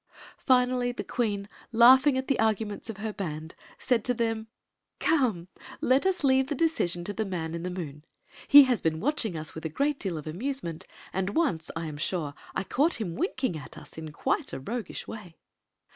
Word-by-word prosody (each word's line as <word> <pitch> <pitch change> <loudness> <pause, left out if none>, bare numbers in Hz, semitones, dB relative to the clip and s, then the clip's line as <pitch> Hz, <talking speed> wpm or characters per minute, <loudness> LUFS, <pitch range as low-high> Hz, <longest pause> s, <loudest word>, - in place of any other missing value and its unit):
Finally 250 -1 +3
the 245 - -5
queen, 205 -5 -1 0.2
laughing 260 +4 +7
at 260 - -2
the 275 - +1
arguments 220 -1 0
of 220 - -5
her 215 +1 -4
band, 160 -5 -5 0.2
said 245 -4 +1
to 250 +1 0
them: 225 -1 -1 0.3
" - - -55
Come! 240 - +1 0.3
Let 265 +8 +3
us 370 -4 0
leave 265 -1 +4
the 290 - -2
decision 215 - 0
to 205 - -3
the 220 - -1
Man 170 -5 -4
in 170 - -4
the 180 - -3
Moon. 155 -5 -6 0.4
He 285 0 +11
has 250 -6 +1
been 160 -1 0
watching 225 - 0
us 155 -1 -6
with 160 - -8
a 160 - -2
great 280 - 0
deal 185 -5 -2
of 150 - -7
amusement, 175 - -4 0.3
and 190 +1 -1
once, 260 - +1
I 165 0 -3
am 150 -2 -6
sure, 155 -2 -2 0.2
I - - 0
caught 290 - +1
him 185 -7 -3
winking 260 - -1
at 145 -4 -9
us - - -11
in 160 -1 -7
quite - - -1
a - - -3
roguish 225 - -5
way." 200 -7 -9
215 Hz, 200 wpm, -28 LUFS, 170-260 Hz, 0.4 s, He